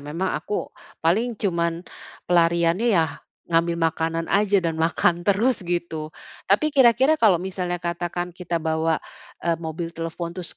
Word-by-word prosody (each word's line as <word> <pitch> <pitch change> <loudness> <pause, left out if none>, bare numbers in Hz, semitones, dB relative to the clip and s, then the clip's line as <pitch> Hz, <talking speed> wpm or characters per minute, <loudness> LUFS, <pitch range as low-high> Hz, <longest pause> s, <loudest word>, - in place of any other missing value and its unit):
memang 165 +6 -3
aku, 205 +7 -4 0.3
paling 220 +7 +2
cuman 170 -3 -1 0.4
pelariannya, 170 +4 +3
ya, 160 -1 0 0.2
ngambil 170 0 +1
makanan 165 0 0
aja 205 0 +3
dan 160 -1 -1
makan 170 +1 +2
terus 205 +7 +2
gitu. 170 -3 -3 0.4
Tapi 295 +10 +3
kira-kira 265 +1 +5
kalau 205 -6 +6
misalnya 180 0 -3
katakan 175 0 -3
kita 175 -1 -3
bawa, 160 0 0 0.5
eee, 170 -1 +2
mobil 165 +1 -5
telepon 165 +1 -5
terus 180 -1 -6
170 Hz, 135 wpm, -23 LUFS, 165-190 Hz, 0.5 s, kalau